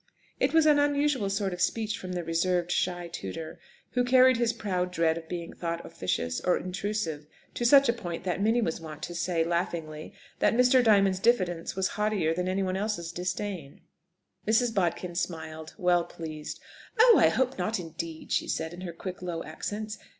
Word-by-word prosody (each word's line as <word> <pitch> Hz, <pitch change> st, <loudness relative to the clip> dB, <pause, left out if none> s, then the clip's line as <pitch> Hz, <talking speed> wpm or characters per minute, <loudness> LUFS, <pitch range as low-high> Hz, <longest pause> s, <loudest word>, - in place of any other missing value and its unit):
It -, -, +2 dB
was 320 Hz, -1 st, +4 dB
an 300 Hz, -1 st, +5 dB
unusual 285 Hz, -6 st, +1 dB
sort 195 Hz, -1 st, -1 dB
of 180 Hz, -, -5 dB
speech 215 Hz, -2 st, 0 dB
from 185 Hz, -1 st, -6 dB
the 175 Hz, -1 st, -2 dB
reserved, 175 Hz, +1 st, 0 dB
shy 175 Hz, -1 st, -1 dB
tutor, 160 Hz, -, -7 dB, 0.3 s
who 250 Hz, -, +1 dB
carried 255 Hz, 0 st, +5 dB
his 235 Hz, -1 st, +2 dB
proud 185 Hz, -6 st, -2 dB
dread 165 Hz, -2 st, +2 dB
of 165 Hz, -1 st, -8 dB
being 170 Hz, -1 st, -5 dB
thought 170 Hz, -1 st, -4 dB
officious 85 Hz, -2 st, -2 dB
or 180 Hz, -, +2 dB
intrusive 185 Hz, -5 st, -3 dB, 0.3 s
to 240 Hz, -, -2 dB
such 275 Hz, +2 st, +7 dB
a 235 Hz, -, +3 dB
point, 175 Hz, -8 st, -6 dB
that 180 Hz, +1 st, -2 dB
Minnie 225 Hz, +3 st, +3 dB
was 165 Hz, -4 st, -2 dB
wont 155 Hz, -1 st, -9 dB
to 175 Hz, -, -4 dB
say, 170 Hz, -1 st, 0 dB
laughingly, 165 Hz, -2 st, -3 dB, 0.2 s
that -, -, +3 dB
Mr. 250 Hz, +1 st, +5 dB
Diamond's 195 Hz, -4 st, +4 dB
diffidence 185 Hz, -7 st, +1 dB
was 190 Hz, 0 st, 0 dB
haughtier 210 Hz, -7 st, 0 dB
than 180 Hz, +2 st, -2 dB
anyone 185 Hz, 0 st, 0 dB
else's 195 Hz, -5 st, -2 dB
disdain. 180 Hz, -2 st, -4 dB, 0.7 s
Mrs. 225 Hz, +2 st, +3 dB
Bodkin 175 Hz, -2 st, -1 dB
smiled, 160 Hz, -2 st, -5 dB
well 180 Hz, -3 st, +3 dB
pleased. 155 Hz, -2 st, -7 dB, 0.4 s
"Oh, 460 Hz, -3 st, +8 dB
I 190 Hz, -, +6 dB
hope 260 Hz, +8 st, 0 dB
not, 215 Hz, -2 st, -1 dB
indeed!" 165 Hz, -1 st, -7 dB
she -, -, +1 dB
said 160 Hz, +1 st, -2 dB
in 175 Hz, -, -9 dB
her 175 Hz, -2 st, -5 dB
quick, 180 Hz, +2 st, -7 dB
low 175 Hz, -2 st, -4 dB
accents. 210 Hz, +7 st, -5 dB
180 Hz, 180 wpm, -28 LUFS, 165-215 Hz, 0.7 s, Oh